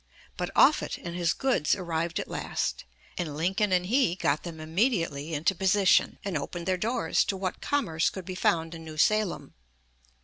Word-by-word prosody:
But - - -3
Offutt - - +4
and 170 0 -7
his 170 -1 +1
goods 260 - +1
arrived 170 -1 -2
at - - -4
last, - - -3 0.3
and 155 -5 -3
Lincoln 190 +5 +1
and 180 -1 +2
he 225 -4 +2
got 150 -5 0
them 165 -2 -8
immediately 165 - -1
into 160 +6 +1
position, 190 +1 +3
and 195 -4 -2
opened 170 +4 -4
their 185 - +1
doors 225 +7 +1
to 195 - -2
what 185 -1 -4
commerce 170 - +1
could 190 -2 -8
be 185 - -5
found 165 -2 0
in 165 -1 -8
New 155 -1 -9
Salem. 215 +3 +1
175 Hz, 175 wpm, -28 LUFS, 160-195 Hz, 0.3 s, Offutt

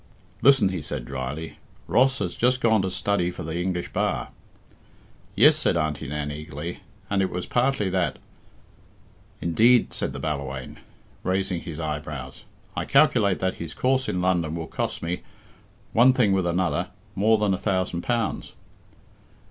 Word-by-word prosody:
"Listen," 135 -7 +6
he 90 -3 -3
said 70 -4 -5
dryly. 70 +5 -5 0.3
"Ross 135 +1 +3
has - - -2
just 125 +1 +2
gone 110 -4 +3
to 95 - -1
study 95 -1 0
for 90 -1 -7
the 80 +2 -3
English 90 -1 -3
bar." - - -1 1.1
"Yes," - - +7
said - - +1
Auntie 75 -2 -2
Nan 75 +1 -3
eagerly, 75 +3 -6 0.3
"and 100 -1 +1
it 95 - +1
was 90 0 -4
partly 125 -4 +1
that 90 -1 0 0.6
" - - -30
"Indeed!" 115 +9 +4
said - - -2
the - - -6
Ballawhaine, 70 -4 -4 0.4
raising 95 -2 0
his 80 -3 -7
eyebrows. 75 -4 -5 0.3
"I - - -1
calculate 100 -3 +4
that 95 0 0
his 80 -1 -6
course 130 +4 +1
in 90 - -1
London 85 -3 +1
will 80 -1 -4
cost - - -3
me, 85 +2 -2 0.7
one 125 +3 +6
thing 115 -6 +3
with 95 -2 +1
another, 85 -3 0 0.3
more 110 +3 +3
than 105 -2 +1
a - - 0
thousand 95 -3 -1
pounds." 120 +1 -2
90 Hz, 155 wpm, -25 LUFS, 80-105 Hz, 1.1 s, Yes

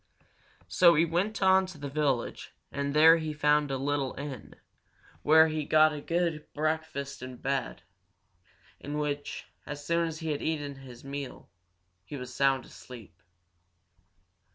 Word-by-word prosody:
So 170 -2 +5
he 160 +3 +4
went 190 +6 -1
on 190 0 +5
to 185 -4 -10
the 145 -1 -6
village, 140 -4 -2 0.2
and 140 +1 -3
there 160 +2 +8
he 155 -1 -4
found 150 0 +2
a 135 - -1
little 140 0 -1
inn, 140 -4 -7 0.7
where 160 +1 +6
he 155 -1 -2
got 155 +1 +4
a 150 - -6
good 165 -2 -2
breakfast 150 -3 -3
and 130 0 -7
a - - -15
bed, 135 -8 -3 1.0
in 145 +1 -5
which, 145 -1 -3 0.2
as 145 0 -7
soon 170 +1 +1
as 160 -1 -5
he 160 -1 -3
had 145 - -3
eaten 145 -3 -3
his 125 -3 -12
meal, 140 0 -7 0.5
he 145 - -8
was 125 -1 -8
sound 135 -2 +2
asleep. 110 -10 -13
150 Hz, 155 wpm, -29 LUFS, 140-160 Hz, 1.0 s, there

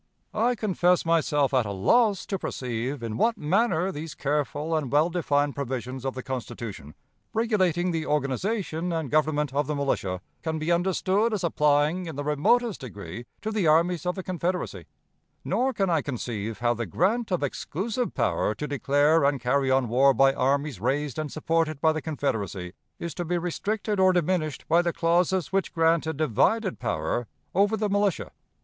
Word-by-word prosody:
"I 240 +3 +2
confess 180 -5 +2
myself 150 -4 +2
at 130 -2 +4
a - - -3
loss 205 - +2
to 195 - -3
perceive 125 +1 -3
in 110 -1 -3
what 230 - +2
manner 185 +2 +1
these 155 -2 -7
careful 150 +2 -1
and 150 -5 -2
well 155 +4 +3
defined 145 -4 +1
provisions 130 -2 -4
of 135 - -2
the 130 - -5
Constitution, 115 - -6 0.4
regulating 185 -6 +1
the 160 -2 -2
organization 165 - -1
and 160 -5 -2
government 150 -2 +1
of 145 0 0
the 150 - -1
militia, 100 -10 -1 0.2
can 160 -1 -2
be 155 +2 -1
understood 190 +5 +1
as 190 - -4
applying 150 +2 +2
in 160 - -6
the 145 - -3
remotest 185 - +1
degree 115 -1 -8 0.2
to 220 - -2
the 210 -6 +1
armies 170 +2 +3
of 180 - 0
the 190 - -5
Confederacy, 180 0 -3 0.6
nor 260 +2 +1
can 195 -6 0
I 160 -3 +2
conceive 115 -5 -4
how 120 0 +1
the 115 -2 -4
grant 215 - +1
of 180 -6 0
exclusive 215 - -3
power 105 - 0
to 150 - -4
declare 145 +3 +3
and 140 -1 +2
carry 130 +2 +1
on 130 -1 +2
war 130 +4 +4
by 135 0 +5
armies 140 -2 0
raised 140 +6 -1
and 155 -2 -3
supported 160 -1 0
by 160 +1 +4
the 155 0 -3
Confederacy 105 - -3 0.2
is 170 -2 -5
to 175 - -3
be 175 +1 -1
restricted 200 +4 -2
or 185 0 +5
diminished 170 -4 -1
by 170 +2 +4
the 170 -1 -1
clauses 175 0 +1
which 195 0 0
grant 165 -1 +2
a 160 - -1
divided 160 - +1
power 110 +2 -2 0.3
over 200 +4 +3
the 215 - 0
militia. 205 -2 0
155 Hz, 175 wpm, -26 LUFS, 135-180 Hz, 0.6 s, by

